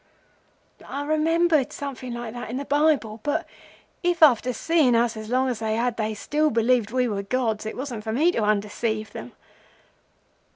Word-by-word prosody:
"I 285 +1 -5
remembered 310 -1 +2
something 265 -3 -6
like 235 -2 -6
that 245 -1 -7
in 245 - -3
the 280 - -4
Bible; 285 -7 +1
but 310 +6 -1 0.6
if, 350 -2 +2
after 250 -3 +5
seeing 290 0 +2
us 235 0 +2
as 215 0 -7
long 255 +2 +2
as 245 -4 -2
they 220 -1 -1
had, 240 +1 0
they 215 -1 -2
still 305 +8 0
believed 235 -2 +2
we 250 +1 +1
were 205 -3 -2
gods 220 0 -1
it - - -6
wasn't 250 -5 -5
for 220 - -3
me 305 +10 +3
to 230 - -1
undeceive 215 +1 -1
them. - - -9
245 Hz, 175 wpm, -24 LUFS, 220-290 Hz, 0.6 s, after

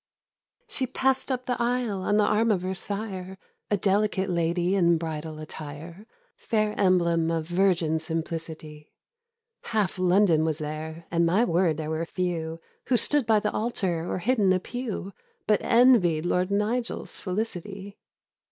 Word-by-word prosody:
She 260 - -2
pass'd 265 +1 0
up 255 -1 -2
the 245 -1 -2
aisle 235 -5 0
on 205 +2 +1
the 210 - +4
arm 225 +2 +2
of 190 -4 +1
her 185 +1 -2
sire, 190 -1 -5 0.3
A 205 - +2
delicate 195 -1 +1
lady 175 +1 +1
in 170 -3 +4
bridal 160 -1 -5
attire, 155 +5 -9 0.3
Fair 215 -1 0
emblem 170 -4 +2
of 165 -1 -1
virgin 175 -3 +1
simplicity: 160 -1 -6 0.7
Half 210 -5 -1
London 180 -3 +4
was 160 -2 0
there, 155 +2 -6
and, 170 0 +2
my 185 +8 +3
word, 170 -5 +2
there 155 -1 -4
were 160 +1 -1
few, 165 -3 -3 0.3
Who 245 - +3
stood 290 0 +2
by 220 -2 +5
the 210 - 0
altar, 185 -7 -1
or - - -1
hid 240 +7 0
in 195 -2 +4
a 185 - +1
pew, 215 -2 -5 0.3
But 210 -1 +2
envied 230 -10 +4
Lord 180 +1 +1
Nigel's 215 +4 -2
felicity. 200 0 -5
185 Hz, 150 wpm, -26 LUFS, 165-215 Hz, 0.7 s, by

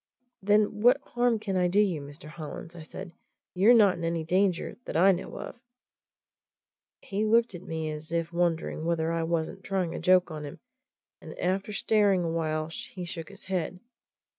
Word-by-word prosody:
"Then 210 +1 +2
what 250 +4 +6
harm 245 -2 +1
can 200 -2 -3
I 180 -1 +3
do 190 +4 +2
you, 185 -8 +2
Mr. 145 +2 -11
Hollins?" 160 +1 -8
I - - -9
asked. 170 +3 -8 0.4
"You're 205 +7 +6
not 200 -6 +5
in - - -5
any 165 -1 -1
danger 185 +2 +1
that - - -2
I 190 +4 +6
know 180 -1 -4
of." - - -8 1.4
He 200 +2 -2
looked 230 +1 +3
at 175 - -7
me 160 -3 -4
as 155 +1 -7
if 170 0 -1
wondering 170 -2 0
whether 165 -1 0
I 165 0 0
wasn't 165 +3 -2
trying 185 -4 -1
a - - -4
joke 180 -1 +4
on 155 -1 -6
him, 145 - -8 0.6
and - - -10
after 190 +3 -1
staring 205 -3 +2
a 165 - -1
while 155 -1 -1
he 180 +3 -7
shook 165 -2 -6
his 200 0 -10
head. 185 -1 -3
175 Hz, 185 wpm, -28 LUFS, 165-195 Hz, 1.4 s, what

